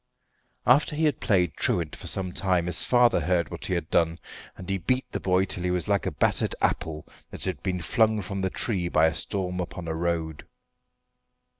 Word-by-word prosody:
After 145 +4 +4
he 160 - -1
had 150 - +1
played 90 -6 +2
truant 85 -4 0
for - - -10
some 95 -2 0
time 90 -2 0
his 90 -1 +1
father 120 -4 +4
heard 85 -1 0
what - - -5
he 90 - 0
had 85 -2 -3
done, 85 0 +2 0.4
and 90 - -9
he 95 0 -1
beat 130 +9 0
the - - -3
boy 95 0 +2
till 90 - -2
he 90 - 0
was 90 -2 -1
like 100 -1 +1
a - - -1
battered - - 0
apple 75 -1 -1 0.2
that - - -6
had 95 - -2
been 90 -2 -2
flung 110 0 +2
from 100 +2 -4
the 95 - 0
tree 90 -4 -1
by 80 -1 +4
a 80 - +2
storm 90 -1 -2
upon 90 -1 -5
a 80 - -2
road. 80 -2 -2
90 Hz, 205 wpm, -26 LUFS, 85-100 Hz, 0.4 s, After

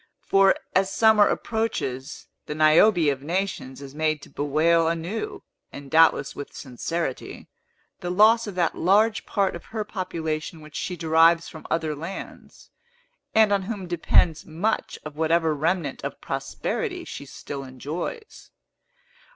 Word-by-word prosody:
For, 195 0 +5 0.2
as 190 +1 +2
summer 220 0 +5
approaches, 180 - -3 0.2
the 150 - -4
Niobe 155 +3 +5
of 135 -1 -5
Nations 150 -5 -3
is 135 -1 -10
made 155 0 0
to - - -13
bewail 160 +3 +2
anew, 200 - -3 0.3
and 140 -1 -10
doubtless 160 -3 +4
with 145 - -8
sincerity, 135 +3 -5 0.5
the 175 - -4
loss 220 +5 +5
of 200 - -6
that 170 -3 +1
large 210 +5 +2
part 195 -4 0
of 170 - -9
her 220 -1 -4
population 165 -5 -4
which 155 0 -13
she 180 - -3
derives 165 +1 +4
from 160 - -10
other 160 -2 -1
lands, 165 +6 -9 0.6
and 220 -2 +5
on 200 - +2
whom 195 -1 -5
depends 170 -1 +2
much 180 +8 -2
of 150 -1 -8
whatever 160 0 +2
remnant 155 -1 -1
of - - -5
prosperity - - -3
she - - -8
still 140 -1 -7
enjoys. 155 - -7
165 Hz, 140 wpm, -25 LUFS, 155-195 Hz, 0.6 s, For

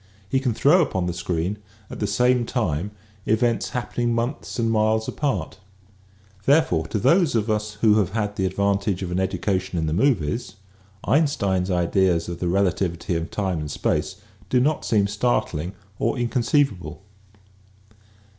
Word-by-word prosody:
He 130 - +1
can 125 -4 -1
throw 165 +10 +5
upon 95 - -1
the 90 - -2
screen 90 +3 -2 0.3
at - - -9
the 105 - 0
same 125 +4 +2
time 100 - -1 0.4
events 115 +2 +1
happening 120 -2 -2
months 120 +5 -3
and 115 -1 +1
miles 110 0 +2
apart. 105 - -2 0.9
Therefore 135 - +3
to - - -2
those 165 - +3
of 110 0 +1
us 105 0 -2
who 110 -1 +5
have 95 -2 -1
had 105 -2 -1
the 95 -1 0
advantage 100 0 0
of 90 - -4
an 90 - 0
education 95 -1 -1
in 80 - 0
the 75 - -1
movies, 105 - 0 0.5
Einstein's 100 - +1
ideas 90 -1 +1
of 85 -1 -5
the 90 - -1
relativity 90 -1 0
of 85 0 -3
time 95 -5 -2
and 75 -1 -5
space - - -1 0.3
do 125 - +3
not 150 +4 +1
seem 105 -3 +2
startling 100 -5 -1 0.3
or 115 - 0
inconceivable. 120 - 0
105 Hz, 155 wpm, -23 LUFS, 90-120 Hz, 0.9 s, throw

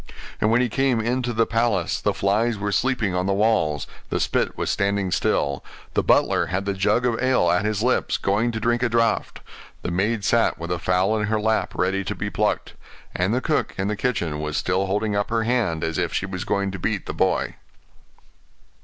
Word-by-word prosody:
And 105 - +2
when 115 +2 +3
he 125 - +2
came 130 0 +1
into 120 +2 -1
the 115 0 +2
palace, 115 -7 0
the - - +2
flies 105 +4 +1
were 100 0 -2
sleeping 110 -3 0
on 90 +1 0
the 100 - +1
walls; 100 -9 +1 0.2
the - - -1
spit - - 0
was - - -1
standing 100 -1 0
still; 70 -5 0 0.3
the - - +2
butler - - +3
had 95 +2 -2
the 100 - 0
jug 105 +5 +1
of 120 -2 0
ale 130 -10 +3
at 90 +4 +1
his 110 0 0
lips, 125 +1 +1
going 105 +5 +1
to 110 - -3
drink 120 +2 +1
a 125 - +2
draught; 115 -1 0 0.4
the - - -2
maid 105 +4 0
sat - - +2
with 85 +2 -6
a 90 - -1
fowl 90 +5 +1
in 105 - -1
her 110 0 +1
lap 110 +1 0
ready 95 +2 0
to - - -3
be - - -4
plucked; - - -1 0.4
and 90 +3 0
the 125 +3 +1
cook 155 +1 -1
in 95 +1 -1
the 105 - -1
kitchen 85 -11 -1
was 75 -1 -2
still 95 +2 0
holding 105 +2 0
up 100 0 0
her 115 0 +1
hand, 110 -9 0
as 80 -1 -1
if - - 0
she - - -1
was 95 -2 -5
going 100 -1 0
to 95 - -6
beat - - -2
the - - -4
boy. - - 0
105 Hz, 215 wpm, -23 LUFS, 95-115 Hz, 0.4 s, when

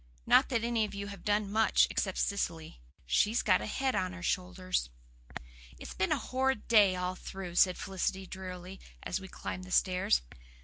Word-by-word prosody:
Not - - +5
that 235 -3 0
any 235 -1 +1
of 210 - -4
you 200 0 -5
have 200 -3 -10
done 205 -1 0
much, 220 +1 +4
except 190 -2 -1
Cecily. 165 - -2 0.2
She's 210 - +2
got 185 -3 +3
a - - -4
head 265 +4 -1
of 185 -1 0
her 185 -1 -9
shoulders." 185 - -1 0.9
"It's - - -8
been 190 - -1
a - - +3
horrid 260 -3 -1
day 205 -5 +5
all 180 0 -2
through," 185 -1 -7
said 180 +1 +4
Felicity 190 0 -3
drearily, 185 0 -8 0.2
as 180 - -2
we 190 - -9
climbed 185 0 -6
the - - -12
stairs. 180 - +2
190 Hz, 180 wpm, -31 LUFS, 180-210 Hz, 0.9 s, Not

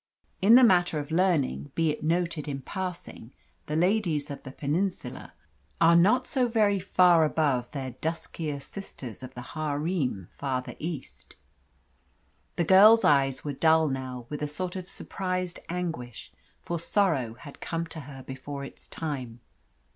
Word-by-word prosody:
In 210 +5 +7
the 255 - +8
matter 180 -7 +4
of 145 +1 -5
learning, 160 - +1
be 165 -2 +2
it 150 - -6
noted 165 -1 0
in 135 -2 -4
passing, 180 - -6 0.3
the 150 - -2
ladies 170 -5 +1
of 140 - -7
the 130 - -9
Peninsula 170 +8 -3 0.4
are 170 0 +6
not 215 +9 +4
so 255 -3 +1
very 210 -4 +2
far 175 -2 +5
above 145 -6 +1
their 135 -3 -5
duskier 160 +1 -4
sisters 140 - -8
of 130 0 -9
the 125 - -7
harem 150 - -2
farther 130 -2 -3
east. 130 - -7 1.2
The 175 - +1
girl's 210 +6 +7
eyes 135 -2 +3
were 145 - -2
dull 160 +2 +4
now, 130 -2 -5
with 150 +2 -6
a 150 - 0
sort 180 +5 -4
of 185 -1 -6
surprised 185 -2 -3
anguish, 165 -10 -5 0.3
for 170 -1 -3
sorrow 160 - +1
had 145 +2 -13
come 165 0 -2
to 160 -1 -8
her 135 -2 -10
before 140 +2 -7
its 140 - -10
time. 130 -7 -5
155 Hz, 150 wpm, -27 LUFS, 135-180 Hz, 1.2 s, the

